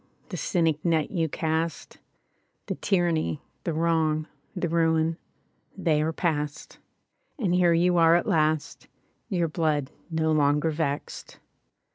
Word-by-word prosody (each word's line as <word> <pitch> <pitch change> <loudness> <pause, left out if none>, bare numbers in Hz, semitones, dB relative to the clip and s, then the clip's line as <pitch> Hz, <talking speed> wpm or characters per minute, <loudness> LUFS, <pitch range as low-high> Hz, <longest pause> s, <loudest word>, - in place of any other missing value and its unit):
The - - -5
cynic 165 -4 0
net 160 -3 +1
you 165 -4 0
cast, 160 +2 -2 0.7
The - - -2
tyranny, 170 -6 0 0.3
the 170 - -1
wrong, 160 -1 +1 0.3
The 180 -1 -1
ruin, 165 0 +1 0.6
ihey 155 -5 +2
are 155 +1 0
past; 155 -3 -3 0.6
And 200 - 0
here 180 -1 +4
you 175 +1 +3
are 165 0 +6
at 175 - +1
last, 155 -1 0 0.4
Your 175 -5 +1
blood 150 -4 -1 0.2
no 160 -1 0
longer 150 +1 +2
vexed. 150 -2 -4
160 Hz, 125 wpm, -26 LUFS, 155-170 Hz, 0.7 s, are